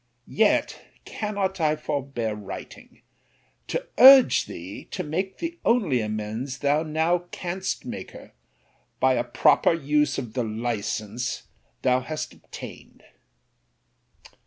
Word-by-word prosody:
Yet 215 -1 +1 0.2
cannot 200 -4 -3
I 155 -1 +3
forbear 140 -7 -3
writing, 105 -2 -10 0.6
to - - -3
urge 265 0 +8
thee 90 +4 -8
to - - -5
make 185 +6 -3
the 340 0 -5
only 195 - +2
amends 110 +5 -4
thou 145 +2 +2
now 165 +3 0
canst 185 +2 -4
make - - -6
her, - - -13 0.7
by 130 0 +4
a 120 -1 +1
proper 150 +4 +3
use 150 -3 +1
of 120 -5 -5
the 125 - -1
license 110 +1 -3 0.4
thou 125 -1 +3
hast 155 +4 -5
obtained. - - -11
145 Hz, 115 wpm, -25 LUFS, 120-175 Hz, 0.7 s, urge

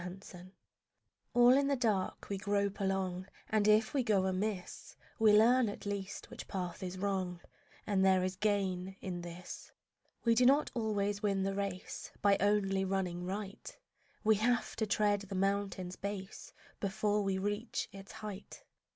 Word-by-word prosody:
LIFE 185 +2 -9 1.0
All 245 0 +7
in 280 0 +3
the 280 - +2
dark 215 -7 -1
we 200 - -2
grope 200 0 0
along, 190 -1 -1 0.2
And 215 -1 +3
if 215 +1 +4
we 280 - +2
go 205 -5 +2
amiss 190 0 -3 0.2
We 220 -1 +6
learn 230 +3 +5
at 205 - -8
least 200 -1 -5
which - - -8
path 180 -2 -4
is 185 0 -4
wrong, 185 -2 -1 0.5
And 195 -3 +2
there 190 -1 +4
is 185 0 -1
gain 190 -2 0
in 180 -2 -4
this. 175 +1 -8 0.5
We 230 - +5
do 240 +2 +4
not 275 +4 +4
always 205 -3 -1
win 195 -2 +1
the 195 0 0
race 195 -2 -4
By 200 -1 +4
only 195 -1 +2
running 185 -2 -1
right; 195 +1 -6 0.5
We 215 -1 +4
have 240 +3 +1
to 220 - 0
tread 205 0 +2
the 200 -1 -7
mountain's 195 -1 -1
base 200 -1 -6 0.3
Before 210 +1 0
we 195 -1 0
reach 205 +4 -2
its 195 0 -10
height. 210 -2 -8
200 Hz, 160 wpm, -33 LUFS, 190-210 Hz, 1.0 s, All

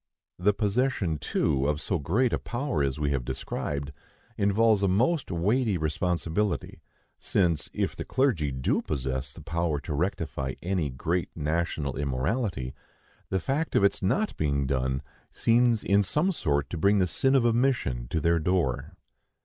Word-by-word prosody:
The 100 +4 +4
possession, 105 - 0
too, 70 0 0
of 75 0 0
so 95 +2 -1
great 110 - +1
a - - +1
power 125 - -2
as 70 +1 -1
we 75 -1 0
have 70 -3 0
described, 70 +3 -4 0.4
involves 105 +1 +3
a 100 - +3
most 130 - +2
weighty 105 +5 +1
responsibility; 85 +4 -1 0.4
since, 85 -6 +1
if - - -2
the - - -4
clergy 110 - +1
do 65 0 0
possess 65 -1 -3
the 80 - -11
power 85 -2 -1
to 80 - -5
rectify 70 -5 -2
any 90 -4 0
great 80 +7 -1
national 75 -3 -1
immorality, 70 - -1 0.6
the 95 - +1
fact 140 - -1
of - - +4
its 100 - +3
not 190 - 0
being 70 -2 +1
done 65 +1 -1 0.3
seems 115 -1 +3
in 100 +1 +4
some 150 - +1
sort 70 - -1
to 85 - -3
bring 100 +5 +4
the 95 - +3
sin 135 - +1
of 130 - +4
the 120 - +4
omission 115 - +1
to 80 - -1
their 85 +2 +2
door. 85 -5 0
85 Hz, 160 wpm, -27 LUFS, 70-105 Hz, 0.6 s, The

